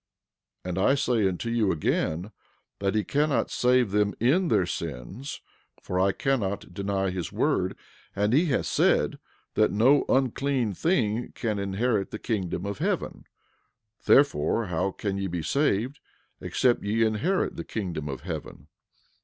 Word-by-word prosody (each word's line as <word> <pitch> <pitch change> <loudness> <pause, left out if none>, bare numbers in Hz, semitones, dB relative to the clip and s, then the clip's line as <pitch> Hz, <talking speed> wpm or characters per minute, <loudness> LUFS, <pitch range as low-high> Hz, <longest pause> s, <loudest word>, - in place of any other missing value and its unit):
11:37 - - -4
And 90 - -3
I 135 - +4
say 125 -7 +2
unto 95 +5 -3
you 110 -5 +2
again 85 +4 -1 0.5
that 100 +1 0
he 110 - +2
cannot 145 +3 +1
save 125 -3 +3
them 105 0 +1
in 155 - +3
their - - +3
sins; 95 - -6 0.4
for 90 - -2
I 95 +1 +4
cannot 100 -8 -2
deny 95 0 -1
his 90 -2 -4
word, - - 0 0.4
and 105 +3 +1
he 160 +6 +4
hath 135 - 0
said - - +2 0.3
that - - +3
no 130 +7 +4
unclean 130 -3 +1
thing 120 - 0
can 110 -4 -2
inherit 100 +1 0
the - - -5
kingdom 95 -5 -2
of 100 -2 -4
heaven; - - -2 0.8
therefore, 115 - +4
how 90 +1 -1
can 100 0 -3
ye 100 - -1
be 85 -2 -3
saved, 135 - 0 0.4
except 125 -2 +1
ye 110 +3 +1
inherit 145 - 0
the - - -5
kingdom 85 -8 -4
of 70 - -5
heaven? - - -7
105 Hz, 150 wpm, -27 LUFS, 95-125 Hz, 0.8 s, I